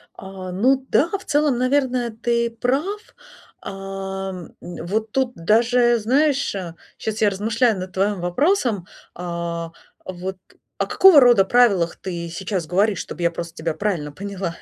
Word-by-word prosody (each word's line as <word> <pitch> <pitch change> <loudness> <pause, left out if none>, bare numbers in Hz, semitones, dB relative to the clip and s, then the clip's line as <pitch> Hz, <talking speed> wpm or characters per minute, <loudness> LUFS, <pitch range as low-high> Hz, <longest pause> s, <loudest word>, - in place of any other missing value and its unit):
А, 190 -1 -8
ну 260 +8 +2
да, 320 - +3
в 395 - -16
целом, 290 -3 +2
наверное, 255 -2 +1
ты 235 +1 -1
прав. 280 - -1 0.6
А, 195 0 -5
м, 180 -3 -10
э, 175 - -8
вот 215 +5 -2
тут 260 0 0
даже 240 +6 +3
знаешь, 275 +3 +1
э, 180 -4 -5 0.2
щас 220 0 -4
я 210 - +5
размышляю 220 +2 +1
над 185 0 -7
твоим 200 +1 0
вопросом. 225 - +1 0.3
А, 170 -1 -4 0.3
вот 185 +1 -6 0.4
о - - 0
какого 375 -6 +7
рода 240 -7 +6
правилах 200 -8 +3
ты 170 -3 -5
сейчас 185 +1 -3
говоришь, 195 +4 +1
чтобы - - -7
я 170 - +3
просто 170 -1 -6
тебя 165 0 -2
правильно 170 -6 -2
поняла? 190 0 -5
200 Hz, 150 wpm, -21 LUFS, 180-245 Hz, 0.6 s, какого